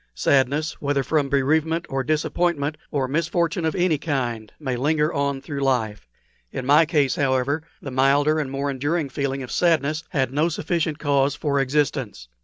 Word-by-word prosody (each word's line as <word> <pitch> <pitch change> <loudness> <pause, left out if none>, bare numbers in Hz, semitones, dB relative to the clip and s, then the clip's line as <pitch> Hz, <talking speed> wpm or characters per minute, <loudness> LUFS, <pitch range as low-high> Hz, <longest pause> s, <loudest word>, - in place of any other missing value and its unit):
Sadness, 140 - +1
whether 140 -1 0
from 145 -1 0
bereavement, 160 +4 +1
or 135 0 -2
disappointment, 155 +1 0
or 135 -3 -1
misfortune 170 +3 0
of 160 - 0
any 175 -5 +2
kind, 120 -8 -2
may 130 -5 -2
linger 150 +5 +1
on 140 -2 -1
through 140 0 -5
life. 110 - -1 0.4
In 130 - -5
my 150 +4 +5
case, 150 -2 +1
however, 135 +1 +1 0.2
the 135 - -5
milder 140 +4 +3
and 145 -3 -2
more 140 +1 -2
enduring 145 +3 -1
feeling 135 0 -2
of 125 - -8
sadness 155 -2 +1
had 130 -3 -1
no 155 +4 +2
sufficient 160 -1 -1
cause 140 -2 +1
for 145 -2 0
existence. 135 - -1
145 Hz, 165 wpm, -23 LUFS, 135-155 Hz, 0.4 s, my